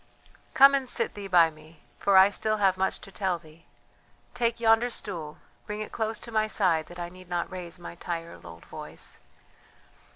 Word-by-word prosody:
"Come 275 Hz, +1 st, +8 dB
and 270 Hz, -2 st, 0 dB
sit -, -, -1 dB
thee 205 Hz, -1 st, -7 dB
by 170 Hz, -3 st, +5 dB
me, 155 Hz, 0 st, -18 dB, 0.2 s
for 200 Hz, -1 st, +4 dB
I 190 Hz, +2 st, +8 dB
still 215 Hz, +1 st, 0 dB
have 195 Hz, -2 st, +3 dB
much 190 Hz, +1 st, -1 dB
to 195 Hz, -, -11 dB
tell 190 Hz, -2 st, -1 dB
thee. 160 Hz, 0 st, -18 dB, 0.7 s
Take 235 Hz, -1 st, 0 dB
yonder 225 Hz, +1 st, +4 dB
stool, 160 Hz, -9 st, -5 dB, 0.3 s
bring 210 Hz, 0 st, -4 dB
it 215 Hz, -, -6 dB
close 220 Hz, -1 st, -2 dB
to 235 Hz, -, -7 dB
my 215 Hz, -1 st, +2 dB
side 175 Hz, -7 st, +2 dB
that 175 Hz, -, -11 dB
I 175 Hz, -1 st, -4 dB
need 185 Hz, 0 st, -14 dB
not 175 Hz, 0 st, -2 dB
raise 180 Hz, -1 st, -7 dB
my 175 Hz, -, -9 dB
tired 170 Hz, -1 st, -6 dB
old 85 Hz, -1 st, -12 dB
voice." -, -, -9 dB
185 Hz, 190 wpm, -27 LUFS, 170-215 Hz, 0.7 s, Come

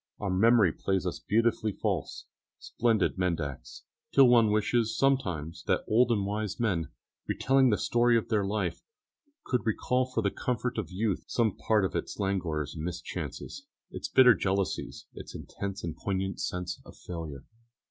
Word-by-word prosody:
Our 100 Hz, -3 st, -3 dB
memory 105 Hz, 0 st, +5 dB
plays 95 Hz, -2 st, -1 dB
us 90 Hz, -, -3 dB
beautifully 110 Hz, -1 st, +1 dB
false -, -, -3 dB, 0.3 s
splendide 115 Hz, -6 st, 0 dB
mendax 85 Hz, -7 st, -3 dB, 0.3 s
till 135 Hz, -2 st, +7 dB
one 115 Hz, -3 st, +5 dB
wishes 110 Hz, +2 st, +1 dB
sometimes 90 Hz, -, 0 dB
that -, -, +1 dB
old 120 Hz, +3 st, +4 dB
and 100 Hz, -4 st, +1 dB
wise 105 Hz, +1 st, -3 dB
men, 95 Hz, -9 st, 0 dB, 0.4 s
retelling 135 Hz, 0 st, +3 dB
the 105 Hz, -, +2 dB
story 120 Hz, 0 st, +3 dB
of 115 Hz, -, -2 dB
their 105 Hz, -3 st, +1 dB
life, 100 Hz, -2 st, -2 dB, 0.6 s
could 125 Hz, -, 0 dB
recall 125 Hz, +3 st, +1 dB
for 120 Hz, -3 st, -2 dB
the 100 Hz, -, +1 dB
comfort 125 Hz, -1 st, -2 dB
of 110 Hz, -, -4 dB
youth 100 Hz, +1 st, -2 dB
some 115 Hz, -4 st, +1 dB
part 105 Hz, -3 st, +2 dB
of 95 Hz, -, -4 dB
its -, -, -3 dB
languors 85 Hz, -7 st, -1 dB
and 80 Hz, -, -6 dB
mischances, 90 Hz, 0 st, -6 dB, 0.2 s
its -, -, -5 dB
bitter 125 Hz, -2 st, +7 dB
jealousies, 95 Hz, +1 st, -2 dB
its -, -, -10 dB
intense 100 Hz, 0 st, -6 dB
and 80 Hz, -2 st, -4 dB
poignant 95 Hz, -1 st, -3 dB
sense 90 Hz, 0 st, -4 dB
of -, -, -14 dB
failure. 80 Hz, -6 st, -7 dB
105 Hz, 155 wpm, -29 LUFS, 90-115 Hz, 0.6 s, till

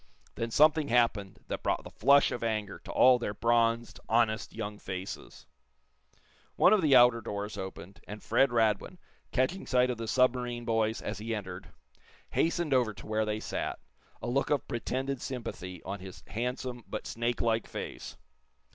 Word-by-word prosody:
Then 115 Hz, -, -3 dB
something 155 Hz, +4 st, +4 dB
happened 115 Hz, -6 st, +1 dB
that -, -, -4 dB
brought -, -, -1 dB
the -, -, -10 dB
flush 140 Hz, 0 st, +4 dB
of 120 Hz, -, -4 dB
anger 110 Hz, -3 st, -2 dB
to -, -, -6 dB
all 125 Hz, -1 st, +6 dB
their 105 Hz, -3 st, -3 dB
bronzed, 115 Hz, +1 st, +1 dB
honest 110 Hz, -1 st, +2 dB
young 105 Hz, -2 st, -6 dB
faces. 95 Hz, 0 st, -7 dB, 1.1 s
One 190 Hz, -, +6 dB
of 210 Hz, -, +4 dB
the 145 Hz, -5 st, +5 dB
outer 120 Hz, -2 st, +6 dB
doors 105 Hz, -1 st, -5 dB
opened, 95 Hz, 0 st, -8 dB
and 105 Hz, 0 st, -8 dB
Fred 135 Hz, -, +3 dB
Radwin, 115 Hz, -, +1 dB, 0.3 s
catching 140 Hz, +9 st, 0 dB
sight 125 Hz, -1 st, +3 dB
of 120 Hz, -, -5 dB
the 115 Hz, -, -4 dB
submarine 125 Hz, -1 st, +1 dB
boys 115 Hz, -1 st, 0 dB
as -, -, -4 dB
he 115 Hz, +1 st, -3 dB
entered, 95 Hz, -3 st, -7 dB, 0.6 s
hastened 170 Hz, -3 st, +1 dB
over 120 Hz, -5 st, +2 dB
to -, -, -11 dB
where 110 Hz, 0 st, 0 dB
they 105 Hz, 0 st, -2 dB
sat, -, -, -3 dB, 0.5 s
a -, -, -3 dB
look 135 Hz, +3 st, 0 dB
of 145 Hz, -3 st, 0 dB
pretended 130 Hz, +3 st, -3 dB
sympathy 95 Hz, -8 st, -6 dB
on 100 Hz, +1 st, -5 dB
his 95 Hz, 0 st, -10 dB
handsome 125 Hz, +1 st, -4 dB
but -, -, -5 dB
snake 120 Hz, +1 st, -2 dB
like 115 Hz, -1 st, +1 dB
face. -, -, -7 dB
115 Hz, 165 wpm, -30 LUFS, 105-125 Hz, 1.1 s, all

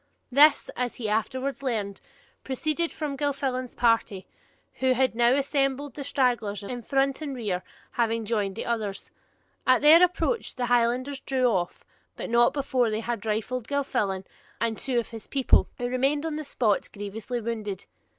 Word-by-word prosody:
This, 290 Hz, +3 st, +5 dB
as 250 Hz, -1 st, -2 dB
he 225 Hz, -, -4 dB
afterwards 260 Hz, +6 st, -1 dB
learned, 215 Hz, -7 st, -2 dB, 0.4 s
proceeded 310 Hz, +5 st, -1 dB
from 295 Hz, -3 st, -4 dB
Gilfillan's 270 Hz, -3 st, -2 dB
party, 230 Hz, -5 st, +1 dB, 0.5 s
who 260 Hz, 0 st, +3 dB
had 260 Hz, 0 st, +2 dB
now 240 Hz, +2 st, +4 dB
assembled, 275 Hz, -1 st, 0 dB
the 285 Hz, -, -6 dB
stragglers 240 Hz, -7 st, 0 dB
in 245 Hz, +4 st, -5 dB
front 270 Hz, +4 st, 0 dB
and 285 Hz, -3 st, -4 dB
rear 205 Hz, -7 st, -2 dB, 0.3 s
having 230 Hz, -1 st, 0 dB
joined 205 Hz, -3 st, -1 dB
the -, -, -4 dB
others. 215 Hz, -4 st, -3 dB, 0.6 s
At 255 Hz, +2 st, +5 dB
their 320 Hz, +4 st, +8 dB
approach 360 Hz, +6 st, 0 dB
the 250 Hz, -, -1 dB
Highlanders 245 Hz, +3 st, +1 dB
drew 265 Hz, -2 st, 0 dB
off, 185 Hz, -7 st, 0 dB, 0.3 s
but -, -, -5 dB
not 240 Hz, 0 st, +5 dB
before 260 Hz, -4 st, +1 dB
they 215 Hz, +1 st, -1 dB
had 230 Hz, -2 st, -4 dB
rifled 225 Hz, +3 st, -2 dB
Gilfillan 210 Hz, -9 st, -1 dB, 0.3 s
and 230 Hz, -1 st, 0 dB
two 255 Hz, +2 st, -2 dB
of 235 Hz, -, 0 dB
his 225 Hz, -3 st, -9 dB
people, 270 Hz, -2 st, +3 dB
who 245 Hz, -, -2 dB
remained 270 Hz, +4 st, +1 dB
on 320 Hz, -2 st, -2 dB
the 310 Hz, -, -4 dB
spot 235 Hz, -7 st, 0 dB
grievously 215 Hz, +4 st, -5 dB
wounded. 215 Hz, -4 st, -4 dB
245 Hz, 160 wpm, -26 LUFS, 225-275 Hz, 0.6 s, their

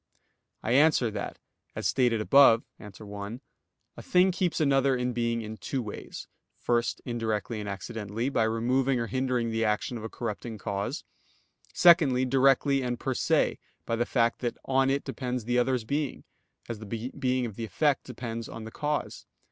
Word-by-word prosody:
I 115 Hz, -, -1 dB
answer 135 Hz, -3 st, +4 dB
that, 105 Hz, -, -5 dB, 0.4 s
As -, -, -4 dB
stated 120 Hz, -4 st, +2 dB
above 125 Hz, -1 st, +6 dB, 0.2 s
(A. 105 Hz, -, -9 dB
1), 105 Hz, +3 st, -8 dB, 0.5 s
a -, -, -9 dB
thing 185 Hz, +1 st, +3 dB
keeps 180 Hz, -2 st, -1 dB
another 135 Hz, -3 st, +3 dB
in 125 Hz, 0 st, -1 dB
being 115 Hz, -1 st, -1 dB
in 110 Hz, 0 st, -7 dB
two 130 Hz, +2 st, -3 dB
ways; 105 Hz, -, -8 dB, 0.3 s
first, 120 Hz, -1 st, 0 dB
indirectly 115 Hz, -2 st, -2 dB
and 105 Hz, -1 st, -5 dB
accidentally, 105 Hz, +3 st, -4 dB
by 115 Hz, -5 st, +2 dB
removing 125 Hz, +4 st, +1 dB
or 115 Hz, -, -1 dB
hindering 125 Hz, -2 st, -1 dB
the 115 Hz, 0 st, 0 dB
action 110 Hz, +2 st, -1 dB
of -, -, -9 dB
a 110 Hz, -, -4 dB
corrupting 115 Hz, -1 st, -5 dB
cause; 100 Hz, -1 st, -3 dB, 0.7 s
secondly, 150 Hz, -8 st, +5 dB
directly 135 Hz, +1 st, +3 dB
and 125 Hz, -2 st, -2 dB
per 130 Hz, -, -1 dB
se, -, -, +1 dB, 0.3 s
by 115 Hz, -, -1 dB
the 120 Hz, +1 st, -1 dB
fact 115 Hz, -2 st, +1 dB
that 120 Hz, -2 st, -2 dB
that -, -, -29 dB
on 135 Hz, 0 st, +2 dB
it 140 Hz, +1 st, 0 dB
depends 125 Hz, -2 st, -4 dB
the 125 Hz, +1 st, +2 dB
other's 125 Hz, -1 st, +1 dB
being, 140 Hz, +4 st, -2 dB, 0.4 s
as 115 Hz, -3 st, -5 dB
the 110 Hz, -, -9 dB, 0.3 s
being 130 Hz, -2 st, +1 dB
of 110 Hz, -4 st, -6 dB
the 115 Hz, -, -4 dB
effect 145 Hz, +5 st, +1 dB
depends 115 Hz, -2 st, -6 dB
on 115 Hz, -, -7 dB
the 110 Hz, -, -8 dB
cause. 150 Hz, +3 st, -3 dB
120 Hz, 175 wpm, -28 LUFS, 115-135 Hz, 0.7 s, above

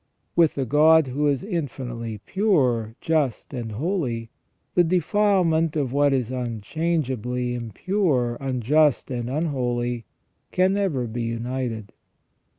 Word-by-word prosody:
With 165 Hz, -3 st, +4 dB
the 135 Hz, -, -1 dB
God 155 Hz, +4 st, +5 dB
who 140 Hz, +3 st, 0 dB
is 140 Hz, -2 st, +1 dB
infinitely 125 Hz, -, -4 dB
pure, 130 Hz, -, +1 dB
just, 150 Hz, -5 st, 0 dB
and 115 Hz, -4 st, -4 dB
holy, 125 Hz, -, -2 dB, 0.4 s
the 175 Hz, -, +5 dB
defilement 175 Hz, -2 st, +2 dB
of 135 Hz, -5 st, -1 dB
what 145 Hz, 0 st, +3 dB
is 130 Hz, -3 st, 0 dB
unchangeably 125 Hz, 0 st, -2 dB
impure, 125 Hz, -, 0 dB
unjust, 135 Hz, +3 st, +2 dB
and 120 Hz, -1 st, -3 dB
unholy 120 Hz, -6 st, -1 dB, 0.5 s
can 185 Hz, +1 st, +3 dB
never 185 Hz, -11 st, 0 dB
be 120 Hz, +1 st, -4 dB
united. 115 Hz, -2 st, -3 dB
130 Hz, 115 wpm, -24 LUFS, 120-160 Hz, 0.5 s, God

